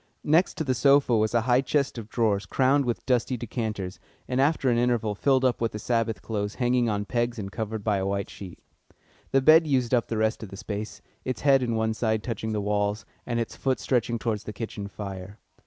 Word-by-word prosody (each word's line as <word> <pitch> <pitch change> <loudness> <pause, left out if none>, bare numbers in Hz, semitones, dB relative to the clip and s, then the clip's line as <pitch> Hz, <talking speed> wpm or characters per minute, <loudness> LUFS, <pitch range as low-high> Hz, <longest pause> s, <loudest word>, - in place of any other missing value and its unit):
Next 165 +5 +3
to 160 - -2
the 130 -3 +1
sofa 140 -1 +4
was 110 +1 +1
a 115 - +4
high 125 +2 +3
chest 140 -1 0
of 110 -1 -9
drawers 105 -4 0
crowned 135 +4 +2
with 120 -1 -2
dusty 125 0 +1
decanters, 110 -5 -4 0.3
and 130 +1 +1
after 145 -1 +2
an 120 - +2
interval 120 -3 +1
filled 130 +5 +2
up 125 -2 +1
with 115 - 0
the - - -3
Sabbath 115 -2 -1
clothes 105 -2 -3
hanging 125 -2 +1
on 105 -1 -1
pegs 120 +3 -1
and 100 -2 -5
covered 110 -1 -4
by 105 -2 +1
a 95 0 -1
white 100 0 -1
sheet; 95 -3 -9 0.7
the 135 - +3
bed 160 +2 +7
used 130 -4 +1
up 120 -2 +2
the 115 - -2
rest 110 +1 0
of 110 - -7
the 95 - -9
space, 105 +1 -6 0.2
its 130 -2 -3
head 135 -2 +5
and 115 -2 -1
one 110 0 0
side 110 -1 -1
touching 110 -2 -3
the 105 - -1
walls, 105 +1 -1 0.2
and 120 -1 -1
its 115 - -3
foot 130 -1 -1
stretching 120 -2 0
towards 110 -2 -3
the 105 - -6
kitchen 105 -3 -5
fire. 100 -1 -7
115 Hz, 220 wpm, -26 LUFS, 105-125 Hz, 0.7 s, bed